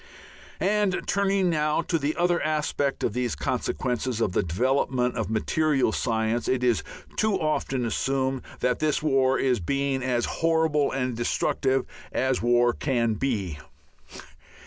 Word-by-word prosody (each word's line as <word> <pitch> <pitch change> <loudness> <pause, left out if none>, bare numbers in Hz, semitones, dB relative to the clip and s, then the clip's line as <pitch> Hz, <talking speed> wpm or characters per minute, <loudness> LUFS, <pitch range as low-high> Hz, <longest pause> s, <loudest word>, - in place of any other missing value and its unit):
And 205 -2 +1
turning 195 -2 +1
now 150 +1 +1
to 165 0 0
the 145 +2 -1
other 175 0 +1
aspect 150 -2 -1
of 105 - 0
these 125 -1 -1
consequences 125 +6 -2
of 105 - +1
the - - +1
development 125 +6 0
of 115 -3 -2
material 135 +4 +1
science, 110 +1 -1
it 130 -1 0
is 120 -9 +2 0.4
too 215 -3 +2
often 145 -5 -1
assumed 130 +2 -1 0.2
that 125 -1 +1
this 155 -1 0
war 135 -3 +3
is 130 -4 +1
being 140 +7 -1
as 125 -2 0 0.2
horrible 160 -3 +2
and 130 -2 -2
destructive 130 +2 0 0.3
as 130 -1 0
war 120 0 +3
can 120 -5 0
be. 100 - -2
130 Hz, 140 wpm, -26 LUFS, 120-150 Hz, 0.4 s, war